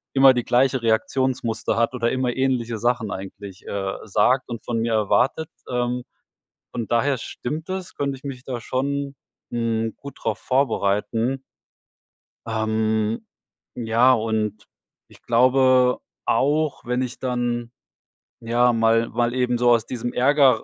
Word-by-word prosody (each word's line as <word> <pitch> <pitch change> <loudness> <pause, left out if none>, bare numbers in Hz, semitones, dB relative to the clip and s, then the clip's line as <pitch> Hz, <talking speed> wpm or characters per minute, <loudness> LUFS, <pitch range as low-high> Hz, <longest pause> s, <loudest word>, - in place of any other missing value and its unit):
immer 135 0 +8
die 120 -1 -1
gleiche 130 +1 +2
Reaktionsmuster 115 0 0
hat 115 +1 +2
oder 115 -1 0
immer 130 -2 -1
ähnliche 125 -3 0
Sachen 120 -1 0
eigentlich, 95 0 -8
äh, 95 -1 -3
sagt 125 +6 +2
und 115 -2 -6
von 115 -1 -2
mir 115 +1 0
erwartet. 110 +9 +1 0.2
Ähm, 125 0 -1 0.7
von 115 -3 -4
daher 130 +4 +2
stimmt 150 +7 -5
es, 190 -1 -4
könnte 140 -1 -2
ich 130 - -21
mich 135 -3 -6
da 125 -3 -4
schon, 140 +3 -2 0.4
hm, 115 -1 -1
gut 140 -1 -10
drauf 110 -1 -1
vorbereiten. 125 0 0 1.1
Ähm, 110 0 0 0.5
ja, 120 +2 +4
und 110 -2 -1 0.4
ich - - -19
glaube 130 +1 +4 0.3
auch, 150 +2 +1
wenn 125 +1 0
ich 125 -1 -4
dann, 120 -2 -2 0.7
ja, 120 +1 +2
mal 115 0 +3
mal 120 +1 0
eben 125 -1 +1
so 120 0 +3
aus 115 -1 +3
diesem 120 -1 -4
Ärger 130 -2 +4
120 Hz, 135 wpm, -23 LUFS, 115-130 Hz, 1.1 s, immer